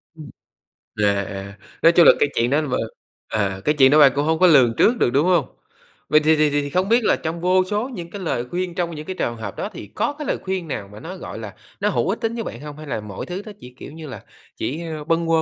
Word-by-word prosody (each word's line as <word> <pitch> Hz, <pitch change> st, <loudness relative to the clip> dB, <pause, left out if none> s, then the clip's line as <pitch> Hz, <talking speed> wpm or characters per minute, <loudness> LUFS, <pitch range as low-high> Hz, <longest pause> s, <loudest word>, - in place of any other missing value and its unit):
Ừm. 155 Hz, -3 st, -10 dB, 0.7 s
À, 100 Hz, -1 st, +2 dB
à, 100 Hz, +1 st, -8 dB, 0.2 s
nói 165 Hz, -, +7 dB
chung 170 Hz, -1 st, +6 dB
là -, -, +10 dB
cái 145 Hz, -, +3 dB
chuyện 120 Hz, +1 st, +2 dB
đó 145 Hz, +3 st, +2 dB
là 150 Hz, -, -4 dB
b 130 Hz, -, -3 dB, 0.5 s
à, 100 Hz, -3 st, -2 dB
cái 150 Hz, -, +2 dB
chuyện 135 Hz, -2 st, +6 dB
đó 150 Hz, -, +6 dB
bạn 140 Hz, -2 st, +8 dB
cũng 145 Hz, +1 st, 0 dB
hông 160 Hz, 0 st, +1 dB
có 185 Hz, -, +6 dB
lường 130 Hz, -8 st, +6 dB
trước 240 Hz, +3 st, +4 dB
được, -, -, +2 dB
đúng 140 Hz, +7 st, +2 dB
hông? 175 Hz, -6 st, +3 dB, 0.6 s
Vậy 155 Hz, -, +6 dB
thì 155 Hz, +1 st, +3 dB
thì 155 Hz, 0 st, +3 dB
thì 145 Hz, 0 st, +1 dB
thì 145 Hz, -, -5 dB
không 185 Hz, +6 st, 0 dB
biết 235 Hz, +1 st, +4 dB
là -, -, +3 dB
trong 165 Hz, +1 st, -5 dB
vô 185 Hz, +1 st, +3 dB
số 210 Hz, +6 st, -2 dB
những 175 Hz, -10 st, -7 dB
cái 200 Hz, -, -7 dB
lời 125 Hz, -9 st, -2 dB
khuyên 180 Hz, -1 st, -3 dB
trong 170 Hz, -2 st, -2 dB
những 150 Hz, 0 st, -7 dB
cái 185 Hz, -, -5 dB
trường 120 Hz, -9 st, -2 dB
hợp 105 Hz, -4 st, -6 dB
đó -, -, -4 dB
thì -, -, -9 dB
có -, -, 0 dB
cái 300 Hz, -, -5 dB
lời -, -, 0 dB
khuyên 190 Hz, -3 st, -3 dB
nào 105 Hz, -9 st, -5 dB
mà 105 Hz, -, -11 dB
nó, 180 Hz, +9 st, -8 dB
gọi 145 Hz, -, -8 dB
là, 105 Hz, -3 st, -8 dB, 0.2 s
nó 205 Hz, -, +1 dB
hữu 200 Hz, -, 0 dB
ích 220 Hz, +4 st, -2 dB
tính 225 Hz, 0 st, -1 dB
với 230 Hz, -, -3 dB
bạn -, -, -7 dB
hông, 150 Hz, 0 st, -9 dB
hay 155 Hz, 0 st, -10 dB
là 125 Hz, -, -2 dB
mọi 105 Hz, -2 st, -7 dB
thứ 180 Hz, +2 st, -5 dB
nó 215 Hz, -, -8 dB
chỉ, 125 Hz, -, -12 dB
kiểu -, -, -10 dB
như 160 Hz, 0 st, -9 dB
là, 130 Hz, -, -9 dB, 0.3 s
chỉ, 155 Hz, +6 st, -3 dB
ơ, 155 Hz, -2 st, -5 dB
bâng 165 Hz, +1 st, 0 dB
quơ 165 Hz, -1 st, +3 dB
155 Hz, 290 wpm, -21 LUFS, 130-180 Hz, 0.7 s, là